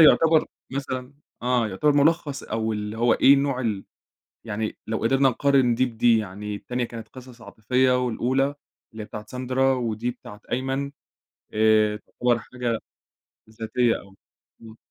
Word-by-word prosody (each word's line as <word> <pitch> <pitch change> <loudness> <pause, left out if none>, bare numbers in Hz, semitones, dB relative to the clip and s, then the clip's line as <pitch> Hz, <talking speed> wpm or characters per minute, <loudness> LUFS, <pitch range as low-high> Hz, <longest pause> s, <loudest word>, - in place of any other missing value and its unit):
يُعتبر 160 0 +6 0.3
مثلًا 130 -1 -4 0.3
آه 125 -2 +1
يُعتبر 125 +10 +2
مُلَخّص 145 0 +2
أو 110 0 -2
اللي 105 +1 -4
هو 120 0 +4
إيه 140 - +6
نوع 140 -2 0
ال 105 -5 -2 0.6
يعني 110 -1 -3
لو 110 0 -1
قدرنا 135 +4 +3
نقارن 130 -1 +3
دي 130 +2 +2
بدي، 115 -1 +3
يعني 105 0 -5
التانية 125 +4 -3
كانت 115 -1 -8
قصص 125 -2 -13
عاطفية 125 +4 +1
والأولى 125 +3 +1 0.5
اللي 110 -1 -7
هي - - -8
بتاعة 105 0 -8
ساندرا، 130 +2 +1
ودي 120 -1 -2
بتاعة 105 -3 -12
أيمن 135 +2 -1 0.6
آآ 110 -1 +4
تُعتبر 120 +2 -1
حاجة 120 0 -3 0.7
ذاتية 115 +2 0
أو 100 -1 -17 0.5
إمم. 110 -1 -12
120 Hz, 145 wpm, -24 LUFS, 110-130 Hz, 0.7 s, يُعتبر